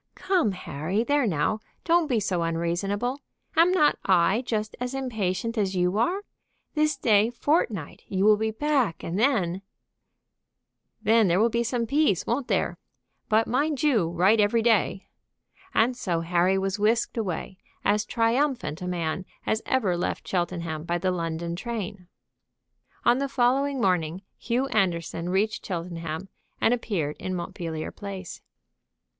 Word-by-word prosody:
"Come 355 - +1
Harry 180 +4 -2
there 285 -1 +2
now 165 +4 0 0.2
don't 340 -1 +3
be 245 -6 +1
so 190 -4 -1
unreasonable. 175 - -1 0.4
Am 335 +2 +5
not 305 -5 +3
I 190 +4 +3
just 215 -2 -2
as 250 +2 -3
impatient 225 -4 -2
as 195 -2 0
you 180 +1 +1
are? 370 - +1 0.5
This 305 -1 +1
day 220 -3 +4
fortnight 235 - -1
you 190 0 0
will 215 0 +7
be 220 +1 -1
back, 250 - 0
and 175 +4 -2
then 195 -8 +1 0.7
" - - -47
"Then 220 0 +4
there 175 +1 +3
will 230 +2 +3
be 235 +1 +1
some 235 0 -1
peace, 275 - +2
won't 245 +3 -1
there? - - 0 0.5
But 220 +1 +4
mind 285 +4 0
you 225 - +3
write 185 +6 +3
every 215 +2 +3
day." 205 -4 +2 0.7
And 245 -2 +2
so 175 -9 -1
Harry 175 +3 +2
was 195 +1 -1
whisked 225 +3 +2
away, 190 -3 -3 0.3
as 210 +1 +3
triumphant 235 - 0
a 180 - -4
man 175 0 -2 0.2
as 220 - 0
ever 215 -9 +1
left 175 - -3
Cheltenham 170 -3 -2
by 175 +1 -1
the 185 +2 0
London 170 -1 -3
train. 205 -3 -5 1.0
On 240 +2 +5
the 275 0 -1
following 270 +2 +2
morning 180 -3 0 0.2
Hugh 245 +3 0
Anderson 175 -5 0
reached 205 +4 0
Cheltenham 170 -1 -4 0.3
and 230 - +3
appeared 185 -11 -2
in 185 0 -3
Montpellier 165 -2 -4
Place. 195 -3 -7
205 Hz, 150 wpm, -26 LUFS, 175-240 Hz, 1.0 s, will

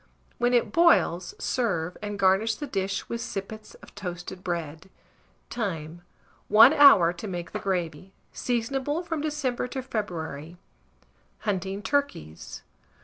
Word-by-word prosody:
When 245 +1 +2
it 230 -3 +2
boils, 335 - +3
serve, 190 - -1
and 205 -1 -4
garnish 200 +3 +3
the 295 - -5
dish 195 -6 -3
with 235 0 -4
sippets 215 0 -7
of - - -14
toasted 180 -1 -7
bread. 165 -1 -4 0.6
Time. 170 -7 -4 0.5
1 220 +7 +8
hour 275 - +7
to 180 +5 -7
make 175 -3 -5
the - - -4
gravy. 180 -2 -3 0.2
Seasonable 270 +7 -2
from 325 -3 -3
December 285 -5 -2
to 265 +1 -5
February. 170 - -5 0.8
HUNTING 195 -1 -2
TURKEYS. 280 - -3
200 Hz, 125 wpm, -26 LUFS, 175-250 Hz, 0.8 s, 1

